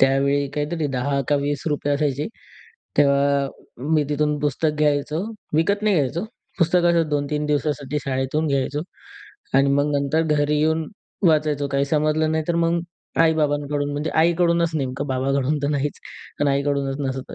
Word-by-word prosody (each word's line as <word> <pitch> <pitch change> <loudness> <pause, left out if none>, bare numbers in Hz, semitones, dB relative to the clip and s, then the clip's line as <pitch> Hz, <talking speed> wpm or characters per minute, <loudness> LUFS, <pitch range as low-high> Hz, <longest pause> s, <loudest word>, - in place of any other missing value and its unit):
त्यावेळी 140 +1 +3
काहीतरी 150 +2 -1
₹10 140 +1 -1
का 145 - +3
₹20 145 0 -1
असायचे, 145 0 -1 0.7
तेव्हा 140 -1 +3 0.5
मी 150 -1 +3
तिथून 150 0 +1
पुस्तक 150 +2 +1
घ्यायचो, 150 0 +1 0.4
विकत 200 +7 +2
नाही 210 -1 +3
घ्यायचो. 155 +5 0 0.3
पुस्तक 175 0 +3
असं 165 -2 +2
2-3 150 0 -1
दिवसासाठी 150 -1 -1
शाळेतून 135 +3 -1
घ्यायचो 140 +1 0 0.8
आणि 140 0 +4
मग 145 +1 +2
नंतर 140 +3 +1
घरी 150 0 +1
येऊन 160 +1 +1 0.4
वाचायचो. 150 -2 +2
काही 140 0 +1
समजलं 155 +2 +1
नाही, 160 0 0
तर 170 - +1
मग 170 +1 +1 0.4
आई-बाबांकडून, 145 -2 +1
म्हणजे 145 +2 -2
आईकडूनच 170 +1 +3
नेमकं, 135 -1 -2
बाबांकडून 135 +2 0
तर 140 - +1
नाहीच, 145 0 -1 0.4
पण 145 - +3
आईकडूनच 140 0 0 0.2
असं 130 - -7
145 Hz, 140 wpm, -22 LUFS, 140-155 Hz, 0.8 s, आणि